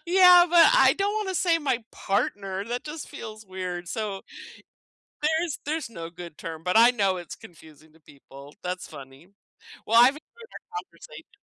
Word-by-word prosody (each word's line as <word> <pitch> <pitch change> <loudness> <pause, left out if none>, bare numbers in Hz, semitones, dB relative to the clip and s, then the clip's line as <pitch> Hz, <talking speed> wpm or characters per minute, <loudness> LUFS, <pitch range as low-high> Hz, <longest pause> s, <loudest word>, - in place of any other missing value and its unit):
Yeah, 360 -1 +7
but 335 -1 +7
I - - +5
don't 400 +1 -1
wanna 400 -3 -3
say 335 -2 +2
"my 255 -7 -2
partner," 195 -1 -2
that 240 +2 -5
just 305 +1 -8
feels 215 -1 -9
weird, 180 -2 -6
so 205 -2 -4 1.0
there's 320 0 -1
there's 310 -4 -3
no 165 -6 -8
good 175 -2 -11
term, 160 -1 -8
but 180 +4 +1
I 235 +2 +7
know 195 -6 0
it's 175 -2 -8
confusing 155 -2 -17
to 160 - -23
people. 140 -1 -15
That's 180 0 -5
funny. 135 +4 -13 0.6
Well, 230 +2 +4
I've 245 +2 +8
enjoyed 460 +8 -17
our 435 -1 -7
conversation. - - -16
215 Hz, 165 wpm, -25 LUFS, -, 1.0 s, I've